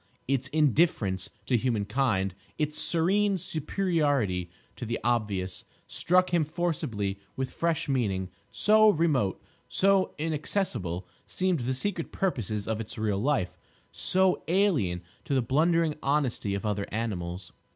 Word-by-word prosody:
Its 135 -1 0
indifference 135 - +2 0.2
to 125 - +2
human 115 -3 +1
kind, 105 -5 0 0.2
its 150 0 -1
serene 195 +4 +2
superiority 145 - 0 0.3
to - - -7
the 115 0 -2
obvious, 105 -6 -1 0.2
struck 185 +1 +2
him 170 -2 +4
forcibly 145 - -2 0.2
with 130 -1 -3
fresh 165 -1 -1
meaning; 100 -9 0 0.2
so 215 +1 +5
remote, 150 - +2 0.3
so 195 0 +2
inaccessible 145 - -2 0.2
seemed 185 -3 0
the 130 +2 -1
secret 170 +3 -2
purposes 110 - -2
of 110 0 -1
its 110 - -7
real 105 -3 0
life, 130 -6 0 0.3
so 190 0 +3
alien 160 - +2 0.2
to 140 - -1
the 130 - +3
blundering 160 +5 +2
honesty 135 -8 0
of 100 - -4
other 105 -1 -1
animals. 90 -5 -4
130 Hz, 130 wpm, -28 LUFS, 105-165 Hz, 0.3 s, so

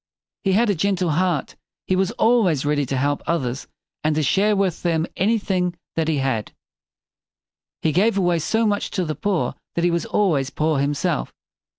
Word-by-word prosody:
He 195 -2 +2
had 220 +2 +3
a - - +2
gentle 185 -1 0
heart. 175 -2 0 0.3
He 185 - +1
was 190 0 +1
always 200 - +2
ready 145 -2 +1
to 135 - -1
help 145 +2 0
others 135 -6 -2 0.4
and 155 0 +1
to 155 - +1
share 205 +9 +3
with 195 -4 0
them 165 -2 +1
anything 190 -4 0 0.2
that 160 -1 0
he 160 -2 +1
had. 130 -6 -1 1.3
He 160 - +2
gave 200 +6 +2
away 175 -3 +2
so 225 +8 +1
much 205 -1 0
to 185 - +1
the 155 - -2
poor 200 +1 -1 0.2
that 170 - 0
he 175 - +3
was 170 0 -1
always 155 -10 +1
poor 155 0 0
himself. 140 - -1
170 Hz, 180 wpm, -22 LUFS, 150-195 Hz, 1.3 s, had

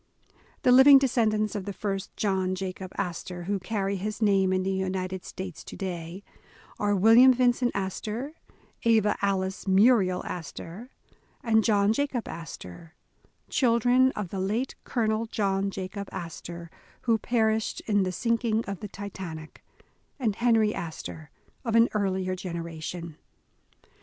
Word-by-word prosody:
The 250 - +5
living 265 +2 +9
descendents 220 -5 +1
of 205 -3 -4
the 200 - -4
first 195 -1 -4
John 190 -2 0
Jacob 185 0 -5
Astor, 175 -1 -4
who 200 +2 -1
carry 195 0 -2
his 210 +3 -4
name 195 -3 +3
in 185 0 +1
the 190 - -1
United 190 -1 -2
States 185 -3 -7
to - - -9
day, 175 0 -5 0.6
are 205 -1 +2
William 225 +6 +7
Vincent 245 0 +2
Astor, 210 +8 -3 0.5
Ava 220 -3 +3
Alice 190 -1 -1
Muriel 190 -2 +4
Astor, 175 - -7 0.5
and 220 -2 +3
John 205 -1 +3
Jacob 270 -2 -2
Astor, 160 - -9 0.5
children 250 +1 +3
of 205 -4 -4
the 195 - -4
late 215 +8 -1
Colonel 225 -2 0
John 195 -2 0
Jacob 195 +1 -6
Astor, 170 -1 -7 0.3
who 230 -2 +2
perished 220 -2 0
in 205 -2 +1
the 185 -1 0
sinking 230 +2 0
of 200 -2 -5
the 210 - -6
Titan 190 -5 -7
ic, 155 0 -13 0.6
and 220 -6 0
Henry 225 -2 +3
Astor 160 -1 -7 0.3
of 230 -3 -1
an 230 +1 +6
earlier 190 -3 0
generation. 170 -2 -6
200 Hz, 135 wpm, -27 LUFS, 185-225 Hz, 0.6 s, living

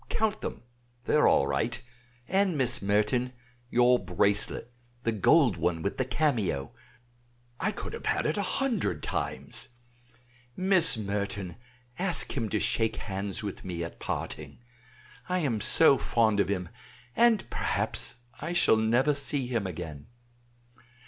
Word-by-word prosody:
"Count 215 -1 0
them, - - -6 0.4
they - - 0
are - - +5
all - - +4
right; 70 - -1 0.5
and 190 -4 +1
Miss 125 -2 +1
Merton, 105 +5 +1 0.4
your 125 0 +4
bracelet, 100 +6 0 0.3
the 115 - +1
gold 110 - +4
one 85 -1 -1
with 100 - -2
the 130 - +1
cameo: 120 - 0 0.9
I - - +1
could - - -7
have - - -6
had - - +1
it 155 - +1
a 205 - 0
hundred 200 - -1
times. - - -3 0.9
Miss 185 -9 +6
Merton, 100 -3 -3 0.4
ask 180 -1 +1
him 115 -5 -2
to 105 - 0
shake 110 +1 +1
hands 100 0 -4
with 100 - -6
me 85 -2 -4
at 85 - -8
parting. - - -5 0.7
I 180 - +1
am 120 -9 -1
so 140 +2 +5
fond 110 -3 +2
of 100 - +2
him, 90 -4 -2 0.5
and 230 -3 +3
perhaps - - -2 0.2
I 165 +4 -4
shall 175 -10 +4
never 120 +6 +2
see 140 -1 -1
him 115 -5 -2
again. 80 -5 -7
115 Hz, 140 wpm, -28 LUFS, 100-150 Hz, 0.9 s, Miss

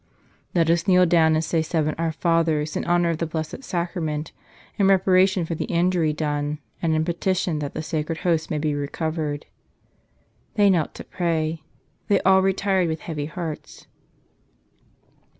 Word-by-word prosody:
"Let 165 -1 +3
us 170 +3 0
kneel 180 -1 +6
down 160 -2 +4
and 155 - +1
say 165 0 +1
seven 155 -1 0
Our 165 -1 0
Fathers 160 -2 +1
in - - -1
honor 175 -1 +2
of 160 - -3
the 165 - -1
Blessed 160 - -5
Sacrament 170 - -3 0.5
in 195 - +4
reparation 190 -1 +4
for 165 - -3
the 160 - -3
injury 170 -2 +1
done 150 -1 -2 0.2
and 160 -2 +1
in 155 0 +1
petition 175 -1 -1
that 145 -1 -5
the 155 - -3
sacred 160 0 -2
Host 165 -2 +1
may 155 - -1
be 150 0 0
recovered." 150 +1 -3 1.1
They 205 -2 +5
knelt 165 -5 0
to - - -8
pray. 160 -2 -2 0.5
Then 200 - +3
all 190 0 +6
retired 190 -1 +1
with 160 -1 -3
heavy 150 -3 -4
hearts. 160 -1 -7
165 Hz, 160 wpm, -23 LUFS, 155-175 Hz, 1.1 s, kneel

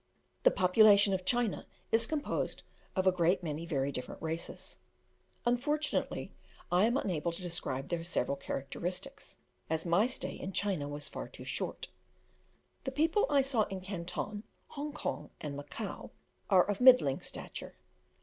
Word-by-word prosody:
The - - +7
population 200 - +6
of 185 -1 -1
China 240 -1 +1 0.2
is 225 0 +4
composed 300 -2 -2 0.3
of 190 -1 +1
a 185 - +7
great 180 +1 +2
many 160 +1 -3
very 140 -3 0
different 125 -2 -5
races: 160 +1 -4 0.7
unfortunately, 290 +5 0 0.4
I 180 +4 +5
am 240 +3 +2
unable 170 - -1
to 170 - -7
describe 140 -6 -3
their 170 -1 -1
several 155 -5 0
characteristics, 175 - -5 0.3
as 160 +1 0
my 175 +7 +4
stay 255 - -2
in 190 - -6
China 185 -9 0
was 145 0 -4
far - - -6
too - - -11
short. - - -3 0.9
The 265 - -2
people 320 +9 +2
I 280 -2 +4
saw 250 -6 +2
in 195 -2 -5
Canton, 190 +2 -4 0.3
Hong 295 +1 -5
Kong, - - -4
and 145 -2 -5
Macao, 145 +9 -6 0.4
are 185 -3 +6
of 205 +1 -1
middling 250 - +7
stature. - - -7
185 Hz, 150 wpm, -32 LUFS, 165-240 Hz, 0.9 s, The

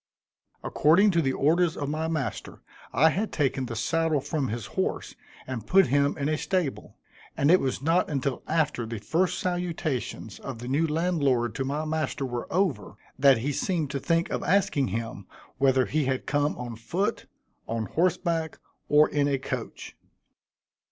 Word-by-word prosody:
According 180 +8 +4
to 170 -2 +2
the 135 -3 0
orders 165 +4 +2
of 145 - -3
my 155 +2 -2
master, 145 -9 -4 0.3
I 155 +6 +4
had 210 +5 -2
taken 135 -3 0
the 120 - -5
saddle 160 +6 +1
from 145 0 -2
his 115 0 -4
horse - - -2 0.3
and 120 -5 -6
put 190 -6 +5
him 145 +1 +2
in 140 -1 -1
a 155 0 0
stable; 180 -8 -2 0.4
and 145 +3 +4
it 185 - +7
was 135 0 -2
not 165 +4 +2
until 140 -2 -2
after 140 -7 0
the 115 0 -4
first 165 - 0
salutations 170 - -3
of - - -6
the 120 +2 -8
new 145 +5 +1
landlord 150 -7 +1
to 135 - -3
my 145 +3 -2
master 155 -3 -2
were 120 -2 -5
over, 185 -4 0 0.2
that 135 -2 +6
he 130 +6 -2
seemed 155 0 -1
to 140 - -2
think 165 +4 0
of - - -1
asking 180 -8 +2
him 115 +3 -5 0.3
whether 130 -1 +4
he 155 -1 0
had 130 0 -1
come 145 0 0
on 120 -2 -6
foot, 180 - -2 0.4
on 115 -1 -2
horse 175 - +1
back, 165 -3 -2 0.3
or 150 +1 +6
in 145 -1 +1
a 140 -1 +1
coach. 135 - -6
145 Hz, 170 wpm, -27 LUFS, 130-165 Hz, 0.4 s, it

